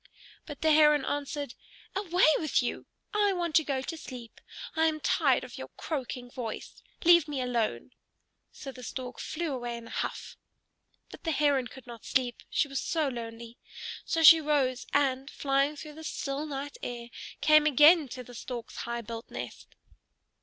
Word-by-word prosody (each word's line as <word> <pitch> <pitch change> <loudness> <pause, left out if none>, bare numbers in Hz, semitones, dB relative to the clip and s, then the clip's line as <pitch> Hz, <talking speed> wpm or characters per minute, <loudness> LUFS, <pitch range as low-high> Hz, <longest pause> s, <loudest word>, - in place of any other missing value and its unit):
But 295 -3 -8
the 315 - +4
Heron 300 -2 +5
answered, 285 -2 -3 0.4
"Away 370 -2 +3
with 310 -4 +1
you! 240 - -4 0.3
I 415 -1 +3
want 345 -3 -2
to 315 - +3
go 270 -3 -2
to 330 - -4
sleep. 250 -7 -10 0.3
I 320 0 +4
am 310 -1 -1
tired - - +2
of - - -9
your - - -6
croaking 250 -5 -4
voice. 240 -4 -6 0.2
Leave 340 -2 +7
me 290 -3 -3
alone!" 235 - -1 0.6
So 275 - -8
the 255 - -12
Stork 250 +1 -6
flew 320 -2 -3
away 240 -2 -4
in 235 - -10
a - - -11
huff. - - -4 0.7
But - - -12
the 330 - -1
Heron 285 -4 +2
could 265 -1 -13
not 235 -3 -10
sleep, 250 -2 0
she 295 - +1
was 275 -1 -3
so 315 -4 0
lonely. 230 -1 -8 0.4
So 325 -1 0
she 325 +1 +10
rose, 275 -4 0
and, 270 -1 +1
flying 275 +1 +1
through 300 +1 -9
the 320 +1 -10
still 290 -1 -3
night 285 0 -5
air, 240 -1 -6 0.3
came 305 0 +6
again 300 +2 +7
to 250 0 -7
the 245 - -13
Stork's 240 0 -7
high 235 0 -3
built 230 +1 -8
nest. - - -8
275 Hz, 175 wpm, -29 LUFS, 245-305 Hz, 0.7 s, she